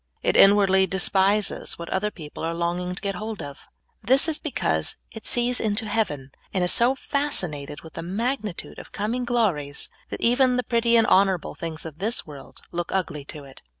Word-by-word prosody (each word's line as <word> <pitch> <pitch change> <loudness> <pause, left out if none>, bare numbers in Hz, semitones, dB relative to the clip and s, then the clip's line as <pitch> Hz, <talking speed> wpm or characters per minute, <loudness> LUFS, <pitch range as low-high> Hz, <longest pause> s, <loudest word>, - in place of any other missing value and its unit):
It - - +2
inwardly 195 -1 +6
despises 195 +2 +2
what 170 - -7
other 210 +2 0
people 155 -7 -9
are 165 +1 -1
longing 175 +1 -2
to - - -9
get 200 -1 -1
hold 215 +3 -5
of. 140 -1 -10 0.3
This 265 +6 +4
is 315 -2 0
be - - -4
cause - - 0 0.2
it 220 - -10
sees 245 +1 +1
into 215 0 0
heaven, 160 -12 -1 0.2
and 185 - 0
is 180 - +2
so 245 +3 +3
fascinated 180 - -2
with 160 - -13
the - - -5
magnitude 210 +2 -3
of - - -12
coming 235 +5 -2
glories 185 -13 0 0.2
that - - -5
even 250 +1 +3
the 250 - +1
prett}' 235 0 0
and 225 - +5
honorable 190 -4 +3
things 165 -1 -6
of 160 0 -9
this 220 +6 -2
world 145 -3 -12
look 175 0 -3
ugly 155 -6 -2
to 150 0 -9
it. 135 -1 -14
195 Hz, 190 wpm, -24 LUFS, 165-230 Hz, 0.3 s, inwardly